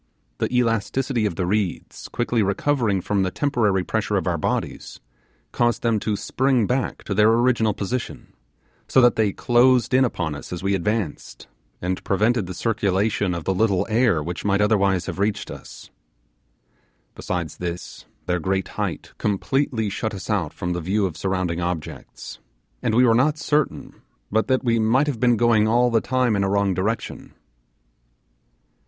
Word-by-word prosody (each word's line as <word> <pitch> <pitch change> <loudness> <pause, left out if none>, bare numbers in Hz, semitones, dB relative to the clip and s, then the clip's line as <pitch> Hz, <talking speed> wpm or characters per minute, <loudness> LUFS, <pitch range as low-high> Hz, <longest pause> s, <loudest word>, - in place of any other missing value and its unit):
The - - -1
elasticity 120 0 0
of 90 - -5
the 90 - -1
reeds 100 -1 -2
quickly 120 -1 -1
recovering 105 0 +1
from 100 +2 0
the 95 - +1
temporary 110 -7 +1
pressure - - -1
of - - -2
our - - 0
bodies, - - -3 0.5
caused 120 -1 0
them 115 -2 +2
to 105 0 -1
spring 130 +2 +1
back 125 +4 -2
to 100 - -3
their 105 +2 +4
original 115 -3 +2
position; 120 +5 -5 0.5
so - - +4
that 120 -1 +5
they 110 -2 +2
closed 125 +3 +3
in 130 +1 +5
upon 85 -10 -1
us 75 - -9
as 90 0 -5
we 100 0 +1
advanced, 100 -3 -3 0.4
and 90 +1 -2
prevented 110 +1 +1
the 90 - -6
circulation 100 -3 0
of 85 - -6
little 95 0 +2
air 110 -9 +2
which 85 +2 -5
might 100 -1 +1
otherwise 100 -3 +2
have - - -5
reached 100 +1 -1
us. - - -11 1.2
Besides 85 -4 -4
this, 85 0 -6 0.2
their 90 0 0
great 95 +2 -1
height - - -4
completely 110 +1 0
shut 110 +1 -3
us 100 +3 -5
out 90 -8 0
from 90 0 -3
the 90 - -3
view 100 +5 0
of 90 -5 -3
surrounding 90 0 -2
objects, 85 -2 -6 0.4
and 110 - 0
we 125 +2 +5
were 115 - +5
not 145 +6 +2
certain 150 -2 -2 0.3
but 110 +2 +1
that 130 -1 +1
we 115 -2 +2
might 115 +6 +3
have 140 -6 -3
been 120 -2 +3
going 115 -2 +3
all 120 +2 +3
the 115 -1 +3
time 125 -3 +1
in 100 - +1
a 95 - 0
wrong 100 -1 +1
direction. 105 +6 -3
105 Hz, 165 wpm, -23 LUFS, 95-120 Hz, 1.2 s, that